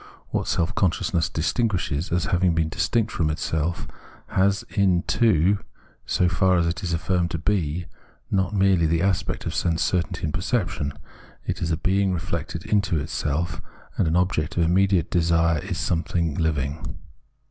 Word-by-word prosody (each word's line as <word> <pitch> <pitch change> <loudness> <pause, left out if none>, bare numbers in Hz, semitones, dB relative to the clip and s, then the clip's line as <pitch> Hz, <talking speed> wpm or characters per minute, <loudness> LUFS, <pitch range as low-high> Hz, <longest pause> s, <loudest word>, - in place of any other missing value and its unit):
What - - -2
self 85 +6 0
conscious 95 +2 0
ness 80 -4 +2
distinguishes 85 - -1
as 85 0 +1
having 90 0 +3
a - - +2
being 80 -1 +1
distinct 115 +6 0
from 80 -3 0
itself, 80 +2 -2 0.4
has 100 +1 +2
in 95 -3 +3
it - - -23
too, 100 -1 +3 0.5
so 90 - +2
far 90 +1 +3
as 85 - +2
it 85 0 -2
is 90 -3 -3
affirmed 85 +1 0
to 85 -2 -4
he, 90 -4 0 0.5
not 95 +1 +1
merely 95 -4 +3
the 85 +2 +1
aspect 95 -3 -1
of - - -2
sense 85 -2 0
certainty 90 0 -1
and 75 -2 -1
perception; 90 -8 -1 0.5
it - - -3
is 85 - -1
a 80 - 0
being 95 +2 +1
reflected 85 +1 -4
into 100 -5 +1
itself, 80 +3 -2 0.3
and - - +1
the 80 +3 +3
object 90 -1 -1
of 85 - +4
im 85 +2 +2
mediate 95 -2 +2
desire 85 -1 +2
is 95 -2 -4
something 85 -3 -1
hving. 75 -2 -2
85 Hz, 170 wpm, -24 LUFS, 80-95 Hz, 0.5 s, of